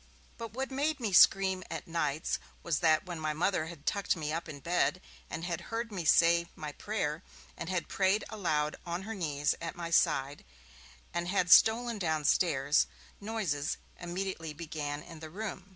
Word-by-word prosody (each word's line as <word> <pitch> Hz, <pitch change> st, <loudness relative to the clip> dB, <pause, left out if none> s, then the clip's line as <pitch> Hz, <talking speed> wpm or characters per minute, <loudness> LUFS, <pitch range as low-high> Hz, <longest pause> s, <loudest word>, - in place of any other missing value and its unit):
But 230 Hz, -2 st, -6 dB
what 265 Hz, +2 st, -3 dB
made 290 Hz, +3 st, 0 dB
me 220 Hz, -5 st, -2 dB
scream 190 Hz, 0 st, +6 dB
at 165 Hz, 0 st, -5 dB
nights 160 Hz, -2 st, -1 dB, 0.2 s
was 170 Hz, -3 st, 0 dB
that 160 Hz, -1 st, +3 dB
when 175 Hz, -3 st, -5 dB
my 155 Hz, -1 st, -1 dB
Mother 165 Hz, 0 st, 0 dB
had 165 Hz, -3 st, -10 dB
tucked 200 Hz, -1 st, +1 dB
me 155 Hz, -2 st, -3 dB
up 165 Hz, 0 st, -4 dB
in 145 Hz, -2 st, -7 dB
bed, 175 Hz, +5 st, +1 dB, 0.3 s
and 165 Hz, -, -5 dB
had 170 Hz, -2 st, -3 dB
heard 230 Hz, 0 st, -3 dB
me 180 Hz, -5 st, -4 dB
say 170 Hz, +2 st, +5 dB
my 150 Hz, -1 st, -6 dB
prayer, 160 Hz, -4 st, -3 dB, 0.3 s
and 165 Hz, -, -6 dB
had 185 Hz, -2 st, -1 dB
prayed 195 Hz, +2 st, +2 dB
aloud 155 Hz, -8 st, -1 dB
on 175 Hz, +2 st, -4 dB
her 220 Hz, +3 st, -5 dB
knees 150 Hz, -7 st, 0 dB
at 165 Hz, -, -4 dB
my 170 Hz, -1 st, -5 dB
side, 145 Hz, -4 st, +2 dB, 0.7 s
and 175 Hz, 0 st, -1 dB
had 180 Hz, -2 st, +1 dB
stolen 230 Hz, 0 st, +6 dB
downstairs 155 Hz, -3 st, +2 dB, 0.3 s
noises 195 Hz, -10 st, -2 dB, 0.2 s
immediately 175 Hz, -2 st, -4 dB
began 150 Hz, -2 st, -5 dB
in 165 Hz, -, -11 dB
the 160 Hz, 0 st, -8 dB
room. 195 Hz, +1 st, -6 dB
170 Hz, 170 wpm, -31 LUFS, 155-195 Hz, 0.7 s, scream